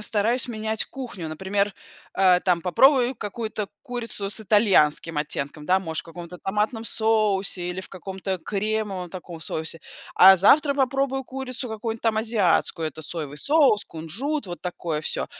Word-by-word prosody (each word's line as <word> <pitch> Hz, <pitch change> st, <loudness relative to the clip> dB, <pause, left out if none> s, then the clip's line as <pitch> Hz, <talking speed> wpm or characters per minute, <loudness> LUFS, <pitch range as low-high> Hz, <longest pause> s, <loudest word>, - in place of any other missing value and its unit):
стараюсь 225 Hz, +4 st, +1 dB
менять 220 Hz, -1 st, -2 dB
кухню. 230 Hz, -, -7 dB
Например, 195 Hz, +5 st, -1 dB, 0.4 s
э, 185 Hz, -2 st, +5 dB
там 175 Hz, -2 st, +2 dB
попробую 255 Hz, -, +4 dB
какую-то 215 Hz, 0 st, -4 dB, 0.2 s
курицу 230 Hz, -6 st, -4 dB
с 215 Hz, -, -2 dB
итальянским 190 Hz, -7 st, +3 dB
оттенком, 150 Hz, 0 st, -4 dB
да, 185 Hz, +1 st, +3 dB
может, 160 Hz, -3 st, -2 dB
в -, -, -31 dB
каком-то 170 Hz, +1 st, -10 dB
томатном 210 Hz, +4 st, -2 dB
соусе 210 Hz, -5 st, +1 dB
или 180 Hz, +1 st, -4 dB
в -, -, -9 dB
каком-то 190 Hz, 0 st, -5 dB
кремовом 205 Hz, -3 st, -2 dB
таком 175 Hz, -3 st, -9 dB
соусе, 160 Hz, +1 st, -4 dB, 0.3 s
а 190 Hz, +1 st, +9 dB
завтра 280 Hz, -, +5 dB
попробую 270 Hz, 0 st, 0 dB
курицу 260 Hz, -1 st, -5 dB
какую-нибудь, 220 Hz, +1 st, -4 dB
там, 225 Hz, -1 st, +1 dB
азиатскую: 205 Hz, -7 st, +1 dB
это 155 Hz, +1 st, -7 dB
соевый 150 Hz, -2 st, -5 dB
соус, 280 Hz, -, +3 dB
кунжут, 210 Hz, -, -4 dB
вот 175 Hz, -2 st, -7 dB
такое 170 Hz, -3 st, -3 dB
всё. 155 Hz, -, -2 dB
200 Hz, 150 wpm, -24 LUFS, 175-230 Hz, 0.4 s, а